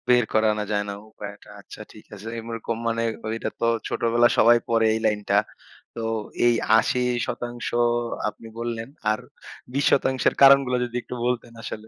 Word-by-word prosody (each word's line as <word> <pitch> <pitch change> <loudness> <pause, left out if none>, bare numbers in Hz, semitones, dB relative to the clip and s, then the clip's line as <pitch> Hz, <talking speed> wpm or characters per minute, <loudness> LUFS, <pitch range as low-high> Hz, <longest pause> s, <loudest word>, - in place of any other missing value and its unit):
বের 125 -1 +5
করে 110 0 +3
আনা 105 0 -2
যায় 105 -1 +1
না - - -3 0.2
উপায়টা। 105 -1 -10
আচ্ছা 100 - -12
ঠিক 105 - -15
আছে। 105 +2 -10
এইরকম 115 0 -4
মানে 115 0 0 0.2
ওইটা 115 +1 -3
তো - - 0 0.2
ছোটবেলায় 120 +1 +2
সবাই 120 +1 +7
পড়ে 115 -1 +3
এই 110 - -1
লাইনটা। 105 -2 +1 0.6
তো - - -7 0.5
এই 120 - +5 0.2
৮০% 120 0 -1 0.6
আপনি 115 - -13
বললেন 115 0 -4 0.2
আর 110 - -1 0.5
২০% 130 -1 +2
এর - - -13
কারণগুলা 135 -2 +6
যদি 120 0 -9
একটু 125 - -8
বলতেন 120 -1 -2
আসলে? 110 0 -7
115 Hz, 155 wpm, -24 LUFS, 110-120 Hz, 0.6 s, সবাই